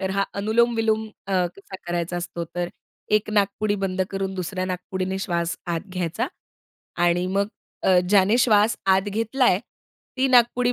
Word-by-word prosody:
तर 190 Hz, -1 st, -1 dB
हा 195 Hz, 0 st, +1 dB
अनुलोम-विलोम 220 Hz, +1 st, +1 dB, 0.2 s
अ, 195 Hz, -, -3 dB, 0.2 s
कसा 195 Hz, -1 st, -10 dB
करायचा 175 Hz, 0 st, -2 dB
असतो 175 Hz, -1 st, -4 dB
तर 175 Hz, 0 st, -1 dB, 0.5 s
एक 215 Hz, -, -10 dB
नाकपुडी 205 Hz, 0 st, +1 dB
बंद 185 Hz, 0 st, 0 dB
करून 195 Hz, -1 st, -3 dB
दुसऱ्या 185 Hz, 0 st, -3 dB
नाकपुडीने 185 Hz, +1 st, -3 dB
श्वास 170 Hz, -2 st, -1 dB
आत 170 Hz, -1 st, -1 dB
घ्यायचा 175 Hz, -3 st, -2 dB, 0.8 s
आणि 175 Hz, +1 st, +2 dB
मग 200 Hz, +2 st, +1 dB, 0.4 s
अ, 185 Hz, -1 st, +5 dB
ज्याने 200 Hz, +3 st, +5 dB
श्वास 215 Hz, -2 st, +4 dB
आत 190 Hz, 0 st, +4 dB
घेतलाय, 225 Hz, 0 st, +2 dB, 0.6 s
ती 265 Hz, +1 st, +2 dB
नाकपुडी 245 Hz, 0 st, +4 dB
195 Hz, 145 wpm, -24 LUFS, 185-215 Hz, 0.8 s, अ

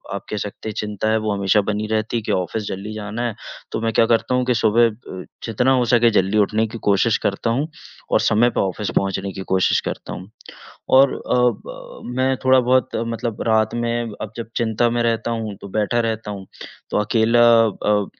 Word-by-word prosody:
आप 100 Hz, -, -6 dB
कह 105 Hz, -, -3 dB
सकते 105 Hz, +2 st, -5 dB
हैं, -, -, -5 dB
चिंता 105 Hz, 0 st, -2 dB
है, 110 Hz, -, +3 dB
वो 110 Hz, -1 st, -1 dB
हमेशा 100 Hz, +1 st, +2 dB
बनी 105 Hz, +1 st, -2 dB
रहती 110 Hz, +1 st, -1 dB
है -, -, -2 dB
कि 105 Hz, -, -2 dB
ऑफ़िस 100 Hz, +3 st, -1 dB
जल्दी 100 Hz, +3 st, -5 dB
जाना 105 Hz, +2 st, -5 dB
है। 115 Hz, -, -4 dB, 0.4 s
तो -, -, -2 dB
मैं 115 Hz, 0 st, 0 dB
क्या 115 Hz, -, +4 dB
करता 115 Hz, +2 st, +1 dB
हूँ 125 Hz, 0 st, +1 dB
कि 125 Hz, -, +2 dB
सुबह 115 Hz, +1 st, +4 dB
अ, 105 Hz, -5 st, -8 dB, 0.2 s
जितना 120 Hz, +3 st, +1 dB
हो 125 Hz, -2 st, +2 dB
सके, 120 Hz, -1 st, +5 dB
जल्दी 100 Hz, -1 st, +1 dB
उठने 105 Hz, +2 st, +2 dB
की 115 Hz, -, -8 dB
कोशिश 105 Hz, +3 st, +3 dB
करता 100 Hz, +3 st, -2 dB
हूँ 135 Hz, +7 st, 0 dB, 0.4 s
और -, -, +4 dB
समय 120 Hz, +3 st, +3 dB
पे -, -, -3 dB
ऑफ़िस 100 Hz, +2 st, -2 dB
पहुँचने 95 Hz, 0 st, -1 dB
की -, -, -6 dB
कोशिश 95 Hz, -1 st, +3 dB
करता -, -, -6 dB
हूँ 95 Hz, +2 st, -9 dB, 0.7 s
और 135 Hz, 0 st, +5 dB
अ, -, -, -2 dB
ब -, -, -2 dB, 0.2 s
मैं 130 Hz, +1 st, +2 dB
थोड़ा 130 Hz, 0 st, +6 dB
बहुत 130 Hz, +1 st, +1 dB
मतलब 115 Hz, -1 st, -3 dB
रात 110 Hz, -1 st, +2 dB
में 120 Hz, -1 st, -2 dB
अब 110 Hz, -, -5 dB
जब 115 Hz, -1 st, -6 dB
चिंता 115 Hz, 0 st, +1 dB
में 120 Hz, 0 st, 0 dB
रहता 115 Hz, 0 st, 0 dB
हूँ, 110 Hz, -3 st, -3 dB
तो -, -, -8 dB
बैठा 110 Hz, +4 st, 0 dB
रहता 110 Hz, -2 st, -2 dB
हूँ। 100 Hz, -2 st, -7 dB, 0.4 s
तो -, -, -1 dB
अकेला 115 Hz, +2 st, +2 dB, 0.2 s
अ, 105 Hz, -1 st, 0 dB
110 Hz, 210 wpm, -21 LUFS, 105-120 Hz, 0.7 s, थोड़ा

